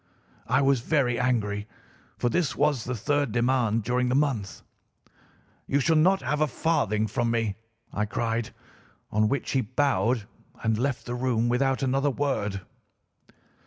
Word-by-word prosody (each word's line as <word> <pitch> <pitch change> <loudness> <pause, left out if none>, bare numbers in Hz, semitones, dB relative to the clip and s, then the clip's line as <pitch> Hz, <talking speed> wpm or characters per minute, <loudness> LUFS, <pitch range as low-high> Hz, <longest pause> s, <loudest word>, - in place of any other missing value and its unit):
"I - - +3
was 135 -1 +3
very 125 -2 +1
angry, 105 -5 0 0.5
for - - 0
this 150 +4 0
was 145 -5 +1
the 125 - -2
third 145 +3 0
demand 120 -2 +1
during 125 +2 0
the 125 - +1
month. 135 -9 -1 1.0
'You 140 - +2
shall 160 +4 +2
not 180 +2 +4
have 150 +4 -1
a 155 - +4
farthing 120 -7 0
from 115 +3 -1
me,' 115 -3 0 0.4
I 105 - 0
cried, 115 +1 -2 0.6
on 105 +1 +2
which 140 - -2
he 135 - +2
bowed 125 -1 +1 0.4
and 110 0 +2
left 130 +3 -2
the 120 - -4
room 120 -2 0
without 135 +2 +1
another 135 +2 +1
word. 120 -8 -1
125 Hz, 150 wpm, -26 LUFS, 115-140 Hz, 1.0 s, not